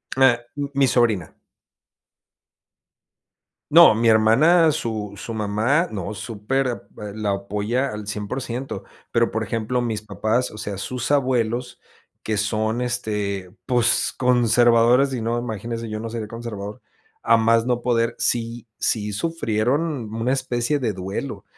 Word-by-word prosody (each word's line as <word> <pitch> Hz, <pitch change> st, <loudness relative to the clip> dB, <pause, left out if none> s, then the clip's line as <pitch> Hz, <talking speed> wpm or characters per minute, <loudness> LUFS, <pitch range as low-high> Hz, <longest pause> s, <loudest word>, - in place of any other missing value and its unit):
Ah, 130 Hz, -2 st, +5 dB, 0.2 s
mm, 145 Hz, -1 st, -2 dB
mi 140 Hz, -1 st, +4 dB
sobrina. 115 Hz, -8 st, +1 dB, 2.4 s
No, -, -, +9 dB
mi 115 Hz, +1 st, +1 dB
hermana, 135 Hz, +10 st, +5 dB
su 110 Hz, -6 st, -3 dB
su 115 Hz, -, -6 dB
mamá, 110 Hz, -, +1 dB
no, 100 Hz, 0 st, -4 dB
súper, 115 Hz, +6 st, -2 dB
a 120 Hz, -, -3 dB
p 105 Hz, -1 st, -9 dB
la 105 Hz, -2 st, -1 dB
apoya 105 Hz, +7 st, -1 dB
al 105 Hz, -1 st, -7 dB
100%, 120 Hz, +5 st, -4 dB, 0.3 s
pero, -, -, +2 dB
por -, -, -2 dB
ejemplo, 115 Hz, +2 st, -1 dB
mis 110 Hz, -3 st, -2 dB
papás, 110 Hz, +4 st, -1 dB
o 105 Hz, -, -11 dB
sea, 100 Hz, -2 st, -5 dB
sus 125 Hz, +7 st, -3 dB
abuelos 125 Hz, -3 st, 0 dB, 0.5 s
que 110 Hz, -1 st, -1 dB
son, 110 Hz, +2 st, 0 dB
este, 105 Hz, -6 st, -3 dB
pues, 125 Hz, -3 st, +2 dB
conservadores 120 Hz, +1 st, +4 dB
y 125 Hz, -, -2 dB
no, 115 Hz, +1 st, -1 dB
imagínese 115 Hz, 0 st, -4 dB
yo 110 Hz, 0 st, -4 dB
no 115 Hz, -, -5 dB
seré 110 Hz, -2 st, -5 dB
conservador, 110 Hz, -1 st, -7 dB, 0.4 s
a -, -, +5 dB
más 115 Hz, 0 st, +3 dB
no 125 Hz, -1 st, 0 dB
poder, 115 Hz, -1 st, +1 dB
sí 115 Hz, 0 st, -1 dB
sí 105 Hz, -2 st, 0 dB
sufrieron 130 Hz, -1 st, -1 dB
una 115 Hz, +3 st, 0 dB
especie 130 Hz, +1 st, 0 dB
de 115 Hz, -6 st, -1 dB
duelo, 95 Hz, +1 st, -5 dB
115 Hz, 140 wpm, -22 LUFS, 105-125 Hz, 2.4 s, No